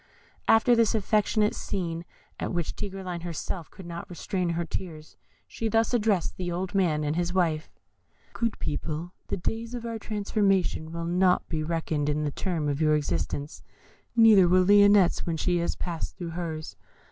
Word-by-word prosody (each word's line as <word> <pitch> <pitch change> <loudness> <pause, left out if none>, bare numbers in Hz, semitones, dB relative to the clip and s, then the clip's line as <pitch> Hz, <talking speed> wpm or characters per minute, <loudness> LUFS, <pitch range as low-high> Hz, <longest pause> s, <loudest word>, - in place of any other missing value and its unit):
After 230 +2 +5
this 230 -1 +3
affecting 210 0 +2
scene, 170 -4 -4 0.3
at - - -2
which 175 -3 -1
even 195 -1 -5
Tigreline 175 -2 -4
herself 170 0 -5
could 190 - -12
not 170 0 -7
restrain 180 0 -2
her 170 0 -1
tears, 160 -3 -6 0.3
she 225 - -3
thus 225 +2 +2
addressed 210 -6 +1
the 180 -1 -3
old 180 +2 -3
man 170 -6 +2
and 150 +1 -1
his 175 +1 -1
wife: 165 -4 +1 0.6
"Good 230 -1 -1
people, 160 +4 -4
the - - -2
days 225 +6 -3
of 240 - -5
your 230 -1 -4
transformation 200 -6 0
will 170 0 -4
not 180 +1 +2
be 160 -2 -1
reckoned 155 -2 -1
in 150 +1 0
the 145 - -1
term 165 -2 -2
of 145 +1 -1
your 155 -1 +4
existence, 140 - -2 0.5
neither 220 -5 +7
will 185 +1 +4
Lionette's 205 -2 +5
when 165 -1 -1
she 175 +2 +1
has 170 0 -1
passed 170 -2 -4
through 170 -2 -5
hers. 160 -2 -5
175 Hz, 170 wpm, -27 LUFS, 160-205 Hz, 0.6 s, neither